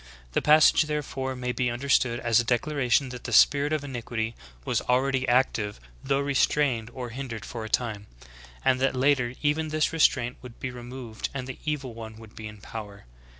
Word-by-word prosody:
"*^ - - -21 0.3
The - - +1
passage 155 +1 +6
therefore 135 -3 -3
may 125 0 -2
be 125 0 0
understood 120 -1 +1
as 115 -1 +4
a - - +2
declaration 130 +1 +1
that 125 -1 -9
the - - -4
spirit 140 +5 +5
of 155 -2 0
iniquity 120 -4 -3 0.3
was - - +1
already 130 +1 +1
active 120 -4 +1 0.2
though 135 0 +1
restrained 135 -4 +1
or 125 -2 -5
hindered 120 -3 -6
for 115 -2 -6
a 110 - -6
time; 105 -3 -1 0.6
and 130 - +4
that 135 0 +1
later 130 -2 +2
even 150 +2 +1
this 155 0 0
restraint 125 -6 +2
would 125 -2 -12
be 130 - -4
removed 120 -2 -6
and 130 -2 -3
the 130 0 -7
evil 140 -5 -2
one 110 -1 -8
would 110 -1 -14
be 110 - -7
in 105 0 -10
power. 105 - -8
125 Hz, 190 wpm, -27 LUFS, 115-140 Hz, 0.6 s, passage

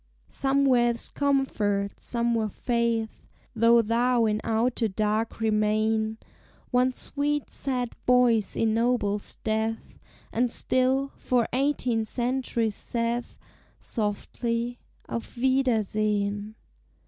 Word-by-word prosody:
Somewhere 270 -3 +3
is 235 -1 -2
comfort, 215 -8 0
somewhere 235 -2 0
faith, 235 0 -1 0.3
Though 230 +1 +5
thou 235 +2 +2
in 215 0 0
outer 230 +1 +1
dark 215 +3 -1
remain; 220 0 +1 0.5
One 250 +1 +3
sweet 290 +2 -2
sad 250 -3 -3
voice 245 -4 +4
ennobles 225 -2 +1
death, 220 +1 -2 0.3
And 245 +2 +2
still, 260 +3 +1
for 245 -3 +1
eighteen 255 -4 +1
centuries 240 -2 -1
saith 235 +2 -3 0.4
Softly, 230 +2 -3 0.3
"Auf 235 +1 -6
wiedersehen!" 215 -5 0
230 Hz, 90 wpm, -26 LUFS, 220-250 Hz, 0.5 s, Though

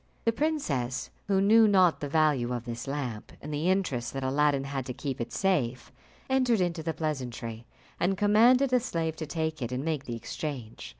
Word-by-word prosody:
The 230 - +4
princess, 220 - -1 0.2
who 195 -1 +3
knew 220 +3 +6
not 185 -5 +4
the 145 - -4
value 145 -5 +2
of 120 -1 -4
this 120 0 -6
lamp, 130 -6 -4
and 150 +1 -7
the 155 +5 0
interest 185 -11 0
that 135 -1 -3
Aladdin 140 +1 +2
had 135 -1 -3
to 125 - -5
keep 135 -2 -4
it 115 - -4
safe, 140 -11 0 0.4
entered 255 -4 +2
into 175 -2 0
the 165 +1 -2
pleasantry, 125 -7 -4 0.3
and 190 +2 +1
commanded 235 +6 +5
a 250 - +6
slave 165 -9 -2
to 155 - -5
take 160 -1 -2
it 120 0 -3
and 130 +3 -3
make 155 -4 -2
the 120 - -4
exchange. 120 0 -6
150 Hz, 190 wpm, -28 LUFS, 130-190 Hz, 0.4 s, knew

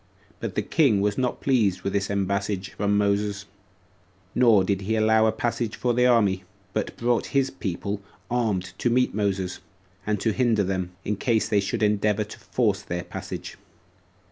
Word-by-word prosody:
But 110 -5 -4
the 105 - 0
king 130 - +3
was 105 0 +1
not 125 -2 -1
pleased 110 -9 +2
with 100 - -2
this 100 -1 0
embassage 100 -1 -1
from 100 0 0
Moses: 100 0 0 0.9
nor 115 -6 +5
did 100 0 0
he 110 +3 -1
allow 110 0 +4
a - - +3
passage 115 0 -2
for 120 -1 0
the 125 +1 +4
army, 100 -6 +3 0.3
but 110 - -2
brought 120 0 +1
his 135 -1 +2
people 100 -3 -4 0.3
armed 110 -7 -1
to 120 - +1
meet 125 +1 +2
Moses, 95 -3 -1 0.5
and 105 -1 +1
to 110 +2 +1
hinder 115 -4 +2
them, 95 -1 -2 0.2
in 105 0 -1
case 115 0 +1
they 105 - +2
should 100 +2 -1
endeavor 105 0 +2
to 105 - -11
force 105 -5 0
their 90 -2 -4
passage. - - -7
105 Hz, 170 wpm, -25 LUFS, 100-115 Hz, 0.9 s, nor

